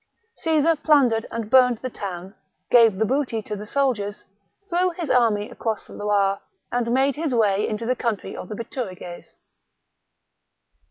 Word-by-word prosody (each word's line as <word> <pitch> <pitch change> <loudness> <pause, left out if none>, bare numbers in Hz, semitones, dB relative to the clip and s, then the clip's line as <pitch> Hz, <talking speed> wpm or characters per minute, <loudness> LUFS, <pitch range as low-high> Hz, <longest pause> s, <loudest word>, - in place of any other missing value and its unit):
Caesar 325 0 +2
plundered 275 -7 +3
and 225 -1 -5
burned 250 -2 +5
the 255 - -5
town; 190 -2 -6 0.4
gave 230 -5 +6
the 220 - +2
booty 260 -1 0
to 210 - -4
the 210 +1 -7
soldiers; 220 -7 -1 0.4
threw 360 +1 +1
his 335 -5 -2
army 225 -4 +2
across 220 -2 -3
the - - -13
Loire, 200 -1 +1 0.3
and 240 -1 0
made 270 +2 +2
his 300 -4 -1
way 210 -3 +2
into 215 +1 -3
the 255 +2 +1
country 230 -4 -3
of - - -8
the 215 - -5
Bituriges. 195 -7 -7
230 Hz, 155 wpm, -23 LUFS, 205-265 Hz, 0.4 s, gave